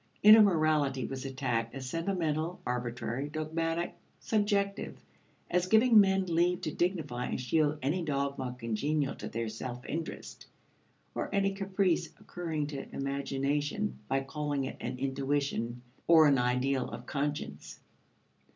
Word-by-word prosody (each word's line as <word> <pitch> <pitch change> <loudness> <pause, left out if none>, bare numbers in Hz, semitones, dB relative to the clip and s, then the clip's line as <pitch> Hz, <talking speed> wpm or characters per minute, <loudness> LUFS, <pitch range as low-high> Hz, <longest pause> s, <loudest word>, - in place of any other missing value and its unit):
Inner 215 +2 +10
morality 155 -8 +3
was 135 0 -5
attacked 125 -4 -2
as 130 -1 -5
sentimental, 165 +1 -1
arbitrary, 125 +2 -3
dogmatic, 165 +2 -2 0.3
subjective 205 -2 0 0.5
as 180 0 +1
giving 220 +2 +6
men 190 -1 +4
leave 175 +1 +1
to 155 - -3
dignify 155 -9 -1
and - - -2
shield 150 +4 +1
any 155 +7 +1
dogma 140 -4 -2
congenial 135 +5 -1
to - - -7
their 115 0 -3
self 120 +3 -6
interest 160 +1 -6 0.7
or - - -3
any 195 -1 +1
caprice 195 -2 0
occurring 160 -4 -3
to 145 -2 -6
imagination 140 +7 -1
by 135 0 +1
calling 145 0 -2
it 130 - -5
an 125 +1 -4
intuition 135 -3 -1 0.2
or 160 -2 +8
an 140 -3 +5
ideal 125 +2 +1
of 120 - -8
conscience. 145 +2 -4
145 Hz, 130 wpm, -31 LUFS, 135-175 Hz, 0.7 s, Inner